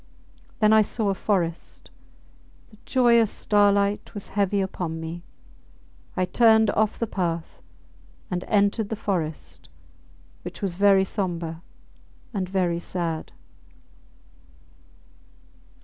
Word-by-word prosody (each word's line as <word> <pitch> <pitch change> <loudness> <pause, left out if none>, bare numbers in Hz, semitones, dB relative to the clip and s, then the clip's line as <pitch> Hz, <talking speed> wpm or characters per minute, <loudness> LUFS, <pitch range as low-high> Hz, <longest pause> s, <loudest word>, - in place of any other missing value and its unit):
Then 215 0 +4
I 220 - +7
saw 215 0 -1
a - - +2
forest. 175 -4 -3 0.8
The 215 - -19
joyous 235 -4 +4
starlight 205 0 +1
was 205 - -7
heavy 200 0 0
upon 180 -4 -3
me. 165 +2 -6 1.0
I 185 - +2
turned 220 0 +4
off 215 0 0
the 230 - -1
path 170 -6 -3 0.7
and 180 0 -2
entered 205 +1 +1
the 220 - -2
forest, 155 - -4 0.7
which - - -8
was 195 -3 -2
very 195 +1 +4
sombre 170 -5 -3 0.7
and 190 -3 -2
very 180 -3 0
sad. 170 -2 -3
195 Hz, 105 wpm, -24 LUFS, 170-210 Hz, 1.0 s, I